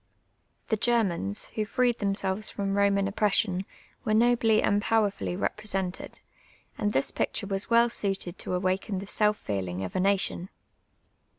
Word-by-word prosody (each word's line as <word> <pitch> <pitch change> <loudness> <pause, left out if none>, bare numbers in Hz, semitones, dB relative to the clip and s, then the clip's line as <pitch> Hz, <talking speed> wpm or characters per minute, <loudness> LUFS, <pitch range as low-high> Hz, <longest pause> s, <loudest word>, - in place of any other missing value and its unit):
The 220 - +2
Germans 195 - 0
who 215 - -2
freed 240 +2 +1
themselves 200 0 0
from 200 -1 -3
lloman 200 -1 +2
oppression 195 -2 +1 0.4
were 215 -3 +1
nobly 230 -1 +4
and 205 0 +2
j)owerfully 205 -4 0
represented, 195 -4 -3 0.5
and 210 -1 -1
this 135 - +1
])icture 200 - -1
was 195 +1 -2
well 235 0 +5
suited 195 -5 -1
to 180 - -2
awaken 185 +2 -1
the 195 - -5
self 210 +1 +2
feelin«^ 95 -2 -3
of 90 - -8
a - - +1
nation. 195 -1 0
200 Hz, 140 wpm, -27 LUFS, 190-215 Hz, 0.5 s, well